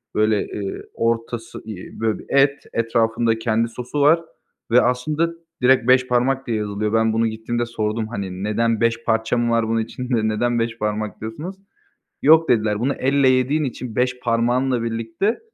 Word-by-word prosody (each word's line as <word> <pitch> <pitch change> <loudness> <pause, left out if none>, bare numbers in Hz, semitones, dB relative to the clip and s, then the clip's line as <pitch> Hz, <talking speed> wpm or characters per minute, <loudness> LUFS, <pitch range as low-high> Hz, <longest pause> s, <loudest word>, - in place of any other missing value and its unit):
böyle, 110 0 +3
eee, 100 -2 -5
ortası, 115 0 -2
iii, 105 -5 -9
böyle, 110 -1 0
bir - - -12
et, 140 0 +3
etrafında 115 0 +1
kendi 115 0 +1
sosu 125 +5 -4
var 155 +4 +5 0.5
ve 125 +2 +6
aslında 150 +6 0 0.3
direkt 125 -1 +4
beş 130 0 +5
parmak 130 +2 +1
diye 115 -2 0
yazılıyor. 105 0 -2
Ben 110 0 +2
bunu 115 +1 +2
gittiğimde 115 +2 -2
sordum, 110 -1 -2
hani, 95 -4 -5
"Neden, 110 +1 0
5 115 0 +1
parça 115 +1 +1
mı 120 0 +1
var 115 -1 +2
bunun 115 0 +1
içinde, 120 0 -2
neden 120 +2 0
beş 115 0 -2
parmak 105 0 -3
diyorsunuz?" 145 - -6 0.7
Yok, 160 +3 +5
dediler, 110 -2 +2
bunu 135 +4 0
elle 135 0 +2
yediğin 130 +4 +2
için, 125 -3 -5
5 125 0 0
parmağınla 120 +1 +1
birlikte 115 - -1
115 Hz, 165 wpm, -21 LUFS, 110-125 Hz, 0.7 s, ve